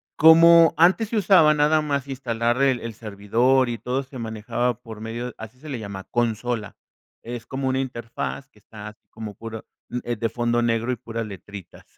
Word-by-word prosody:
Como 165 +1 +7
antes 190 +6 +4
se 230 - -1
usaba 180 -6 +5
nada 150 +1 +3
más 140 -2 -2
instalar 120 -2 -1
el 135 -3 +3
el 115 -1 -6
servidor, 115 +5 +1
y 120 - -3
todo 125 +5 -2
se 130 -1 -11
manejaba 115 +1 -2
por 115 -3 -10
medio 120 +2 -5
así 110 +3 -11
se 155 +2 -11
le 130 -4 -4
llama, 100 -3 -7
consola. 115 -2 -2 0.5
Es 120 0 -7
como 135 0 -3
una 130 0 0
interfaz 115 - -5
que - - -24
está 105 -1 -11
así 105 - -20
como 110 -2 -8
puro 110 +1 -8 0.4
eh, 120 - -2
de 115 +1 -2
fondo 120 +1 0
negro, 115 +1 0
y - - 0
puras 115 -1 -5
letritas, 100 -2 -11
120 Hz, 185 wpm, -23 LUFS, 110-135 Hz, 0.5 s, Como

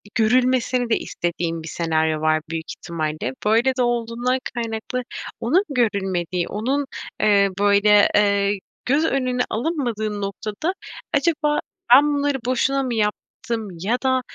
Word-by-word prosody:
görülmesini 250 +1 +2
de 225 - +3
istediğim 165 -1 -3
bir - - -8
senaryo 160 -1 0
var 155 0 +2
büyük 165 0 -4
ihtimalle. 155 -5 -3
Böyle 230 +5 +3
de 255 - 0
olduğundan 240 +1 0 0.2
kaynaklı 230 +2 -3 0.4
onun 320 - +2
görülmediği, 190 - 0
onun, 265 +7 -1 0.4
eee, 200 -2 +4
böyle, 205 0 +5
eee, 200 -1 +2 0.3
göz 285 +5 +2
önüne 255 -4 0
alınmadığın 225 -6 -2
noktada 215 - -3 0.4
acaba 300 0 +2 0.3
ben 290 +3 +6
bunları 285 -1 0
boşuna 270 +2 +1
mı 255 -2 -2
yaptım 220 +2 -3
ya 215 +8 0
da 260 -1 +2
225 Hz, 125 wpm, -22 LUFS, 200-255 Hz, 0.4 s, ben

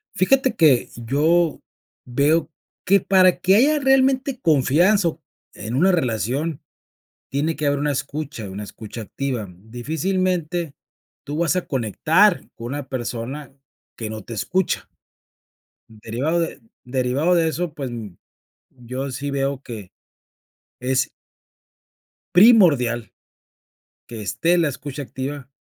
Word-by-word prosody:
Fíjate 260 +7 +3
que 145 -7 +4
yo 150 +7 +1 0.5
veo 150 +6 +1 0.3
que 195 +2 +5
para 185 -2 +4
que 190 +2 +4
haya 295 +7 +4
realmente 270 -1 +2
confianza, 170 - +3
o 160 0 -10 0.3
en 110 +3 -6
una 175 +9 +4
relación, 135 - -1 0.7
tiene 150 +4 -1
que 155 - -3
haber 145 0 +1
una 145 0 0
escucha, 140 -5 -5
una 100 +2 -6
escucha 110 +2 -9
activa. 120 +1 -4
Difícilmente, 160 - -2 0.5
tú 145 +2 -5
vas 170 +2 +1
a 180 - -1
conectar 160 - +2
con 115 - -7
una 140 +1 -5
persona 130 +3 -5 0.4
que 110 -2 -5
no 110 0 -6
te 115 - -7
escucha. 185 - -1 1.0
Derivado, 115 +9 -2
de 165 -4 -3 0.2
derivado 130 +7 +1
de 165 -2 +3
eso, 165 0 -3
pues, 140 -3 -5 0.8
yo 130 +2 -6
sí 140 +3 -4
veo 135 -1 -1
que 110 -8 -9 0.9
es 130 +1 0 1.3
primordial 155 - +5 1.0
que 115 -3 -7
esté 165 - +1
la 170 -3 +2
escucha 140 +2 -6
activa, 135 +1 -6
145 Hz, 120 wpm, -22 LUFS, 125-175 Hz, 1.3 s, que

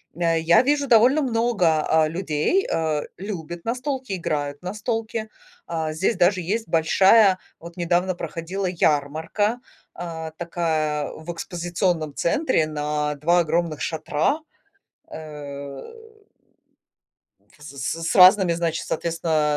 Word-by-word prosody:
э, 165 -1 +1
я 165 +1 +5
вижу, 285 +1 +1
довольно 245 +5 +5
много, 225 - +1
а, 160 -1 +3
людей, 170 - 0
э, 155 -2 0 0.2
любят 175 -4 -6
настолки, 255 0 -3
играют 145 -5 -3
в - - -28
настолки. 220 +2 -3 0.4
А, 160 -2 -2
здесь 185 +8 0
даже 185 +1 +3
есть 215 +7 -2
большая, 190 +5 +5 0.2
вот 170 +1 -11
недавно 175 +1 +1
проходила, 170 +4 -4
ярмарка, 160 - 0 0.3
а, 160 -2 -6
такая 160 -3 -1
в 160 +2 -7
экспозиционном 170 -2 -2
центре 215 - +1
на 150 -1 -2
2 170 +5 +2
огромных 165 -1 -1
шатра, 160 - -1 0.7
эм, 140 -3 -8 1.8
в - - -18
с 150 - -9
з 140 +5 -3
с 165 - -1
разными, 185 -1 +7
значит, 165 -1 -2
соответственно, 160 -2 0
170 Hz, 120 wpm, -23 LUFS, 155-195 Hz, 1.8 s, разными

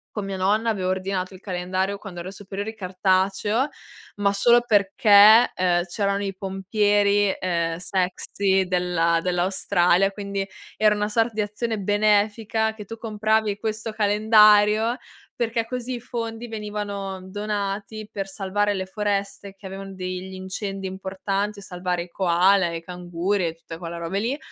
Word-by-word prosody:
con 210 - -3
mia 195 -1 -4
nonna 210 +5 +1
avevo 185 -4 -1
ordinato 185 0 -2
il 185 - -12
calendario, 185 +1 -2
quando 190 -4 -8
ero 180 +2 -6
superiori 205 +2 -6
cartaceo, 190 +5 +1 0.5
ma 200 -1 +2
solo 240 +4 +4
perché, 210 +1 +6
ehm, 175 -1 +1
c'erano 200 +2 -1
i 195 -1 -2
pompieri, 205 +1 +1
ehm, 170 -2 -1
sexy 190 +2 0
della 175 -2 +1
dell'Australia, 180 +1 +2
quindi 200 -1 -4 0.3
era 215 -1 +4
una 210 0 -1
sorta 225 +2 +1
di 215 - -1
azione 215 +2 -2
benefica 210 +2 +1
che 215 -1 -9
tu 225 +3 -8
compravi 215 -1 0
questo 220 +1 -3
calendario, 215 +2 +4 0.4
perché 230 -1 -1
così 250 +1 -4
i 240 - -5
fondi 230 -1 -5
venivano 205 -3 -5
donati 205 +1 -4
per 195 -1 -4
salvare 205 +1 -1
le 190 -1 -3
foreste, 200 0 -3
che 195 - -12
avevan 195 0 -8
degli 185 0 -5
incendi 190 +1 -5
importanti, 195 +2 -3
o - - -9
salvare 180 -2 -3
i 175 - -10
koala, 180 +1 +3
e 170 - -4
i 165 - -6
canguri 180 +2 -2
e 160 - -6
tutte 165 0 -10
quelle 170 0 -6
robe 170 +3 -3
lì, 245 +7 -1
200 Hz, 150 wpm, -24 LUFS, 185-210 Hz, 0.5 s, perché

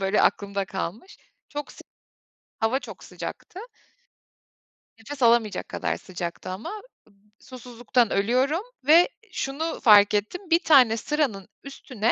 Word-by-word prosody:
böyle, 195 +2 +1
aklımda 200 -1 0
kalmış 220 - -6 0.3
çok, 290 0 -7
sı - - -15 0.8
hava 225 +3 +1
çok - - -11
sıcaktı 370 - -8 1.4
nefes 265 +5 -9
alamayacak 230 -4 +2
kadar - - -2
sıcaktı 175 -1 -7
ama 185 +4 -6 0.5
ım 210 +1 -33
susuzluktan 245 -2 -2
ölüyorum 255 - +1 0.3
ve 335 +6 +6 0.2
şunu 315 0 -3
fark 205 -4 +6
ettim, 275 - -3
bir 335 0 +4
tane 255 -9 +5
sıranın 240 -7 -2 0.2
üstüne, 250 -4 -2
235 Hz, 120 wpm, -25 LUFS, 205-290 Hz, 1.4 s, ve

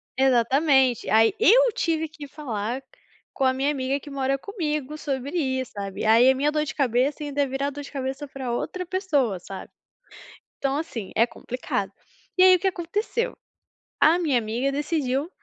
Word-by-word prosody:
Exatamente, 265 0 +3
aí 225 - +5
eu 485 +2 +6
tive 320 -1 0
que 300 -2 -10
falar 245 -4 -4 0.5
com 270 - -2
a 260 - +4
minha 270 +2 0
amiga 270 0 -1
que 290 - -12
mora 275 0 0
comigo 305 - -3
sobre 280 +2 -3
isso, 260 -4 -1
sabe. 200 +1 -5
Aí 230 +4 +6
a 265 - +4
minha 290 +3 +1
dor 305 0 0
de 270 - -5
cabeça 270 +3 +1
ainda 290 0 -1
ia 280 - +2
virar 270 +2 -2
dor 290 +1 -7
de - - -11
cabeça 270 +1 -4
pra 265 -3 -5
outra 365 +9 -3
pessoa, 295 - 0
sabe. 190 +2 -9 0.9
Então 275 +1 -1
assim, 235 -10 -5
é 230 - +5
complicado. 245 +1 -4 0.5
E 370 - +6
aí, 370 0 +8
o - - -1
que 385 - 0
aconteceu? 415 +7 -2 0.6
A 325 +3 +5
minha 295 -8 +2
amiga 235 +5 -1
decidiu, 290 0 -1
275 Hz, 175 wpm, -25 LUFS, 255-310 Hz, 0.9 s, aí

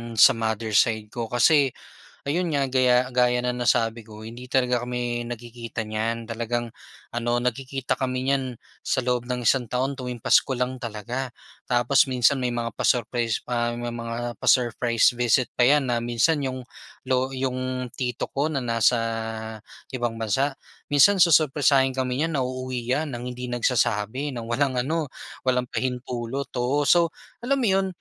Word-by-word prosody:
sa 110 - +8
mother 110 -1 -2
side 110 0 +2
ko, 120 -1 -4
kasi, 135 +4 +4 0.5
ayon 170 +5 0
nga 140 -1 +2
gaya, 125 -1 +4
gaya 125 0 +3
ng 125 0 -2
nasabi 115 -1 +1
ko 110 0 -11
hindi 120 +3 -9
talaga 125 -2 +2
kami 120 -1 -2
nagkikita 120 -1 -6
niyan. 115 +2 -2
Talagang 120 +1 -3 0.4
ano, 120 0 0
nagkikita 130 +2 -2
kami 130 -1 -2
niyan 135 -3 0 0.3
sa - - 0
loob 125 -1 0
ng 125 -1 -2
isang 125 -4 +2
taon 130 +2 0
tuwing 125 -2 -6
pasko 125 - +3
lang 125 +1 -1
talaga. 120 +3 -4 0.4
Tapos 120 +2 +4
minsan 125 +2 +4
may 125 - 0
mga 120 -1 -3
pa-surprise 120 -2 0
pa. 120 -1 0
May 120 0 -4
mga 120 0 -4
pa-surprise 120 -1 +3
visit 120 0 +2
pa 125 - +3
'yan 145 -2 +3
na 120 -1 +1
minsan 120 +6 +2
'yong 130 -1 -4 0.4
lo 130 0 +1
'yong 130 -1 -2
tito 125 -2 -3
ko 145 +3 0
na 140 - -1
nasa 120 -1 +2 1.0
ibang 120 -3 -2
bansa, 135 +6 0 0.3
minsan 185 +7 +5
susurpresahin 145 -5 +4
kami 130 +3 0
'yan 165 -1 -3
na 135 - +1
uuwi 130 -1 -4
niyan 145 +2 0
nang 120 0 -5
hindi 125 0 -6
nagsasabi, 120 +2 0
ng 120 - -5
walang 135 +2 +1
ano, 155 +4 -1 0.4
walang 125 -1 +1
pahintulot, 125 +1 -3
oo. 130 +4 +1
So 170 0 +4 0.3
alam 275 +3 +1
mo - - +3
'yon, 190 0 +2
125 Hz, 160 wpm, -24 LUFS, 120-135 Hz, 1.0 s, sa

